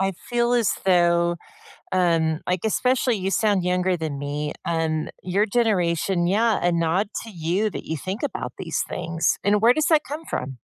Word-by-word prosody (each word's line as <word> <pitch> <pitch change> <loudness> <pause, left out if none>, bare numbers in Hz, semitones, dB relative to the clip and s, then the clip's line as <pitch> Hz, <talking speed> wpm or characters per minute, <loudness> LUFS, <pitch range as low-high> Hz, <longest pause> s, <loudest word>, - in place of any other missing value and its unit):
I 195 0 +1 0.2
feel 240 0 +1
as 235 -3 +3
though, 170 -2 +3 0.6
um- 165 -3 +2
like, 180 -1 0
especially 250 +1 +1
you 190 0 -2
sound 200 -3 +2
younger 180 0 +1
than 155 -4 -4
me- 145 +1 -3
um, 160 -2 -1
your 195 +4 +1
generation 185 -5 +1
yeah, 215 +3 +2
a 175 - +3
nod 170 +4 +1 0.2
to 225 - -9
you 180 +4 -1
that - - -7
you 160 - -3
think 190 - -5
about 290 - -3
these - - -2
things, 165 -1 -1
and 205 0 +3
where 235 +2 +6
does 310 - +1
that 310 -2 +4
come 300 +4 -6
from? 130 -1 -5
185 Hz, 180 wpm, -23 LUFS, 165-215 Hz, 0.6 s, where